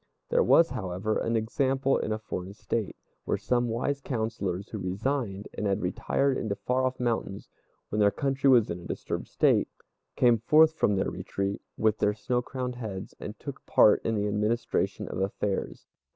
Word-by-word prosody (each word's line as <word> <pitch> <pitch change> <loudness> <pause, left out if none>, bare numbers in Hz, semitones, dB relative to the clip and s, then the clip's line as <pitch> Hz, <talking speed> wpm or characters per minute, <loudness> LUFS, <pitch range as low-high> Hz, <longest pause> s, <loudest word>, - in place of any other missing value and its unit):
There - - +3
was, 165 - +5
however, 95 +4 -2
an 115 - -1
example 135 +4 +1
in - - -2
a 110 - 0
foreign 100 -3 -6
State, 110 -1 -3 0.3
where - - 0
some 120 -1 0
wise 130 +5 -1
councillors, 110 -7 -3
who 110 - -5
resigned 100 +2 -2
and 105 - -2
had 100 -1 0
retired 120 +7 0
into 105 -3 -2
the - - -32
far 130 +1 +2
off 130 - -5
mountains 115 -5 -2 0.4
when 105 - -1
their 105 -1 +6
country 135 +4 +1
was 120 -7 +5
in 85 - -4
a 85 - -10
disturbed - - -4
state, - - +3 0.5
came 120 -2 +4
forth 155 +7 +5
from 105 -10 +2
their 95 - 0
retreat, 100 0 -3 0.2
with 110 -1 +2
their 105 0 +2
snow 120 +3 -1
crowned 125 0 -5
heads, 105 -6 -6
and - - -7
took - - -8
part - - +5
in 115 - 0
the 105 -1 0
administration 105 +3 -1
of - - -4
affairs. 95 0 -2
110 Hz, 180 wpm, -28 LUFS, 100-125 Hz, 0.5 s, their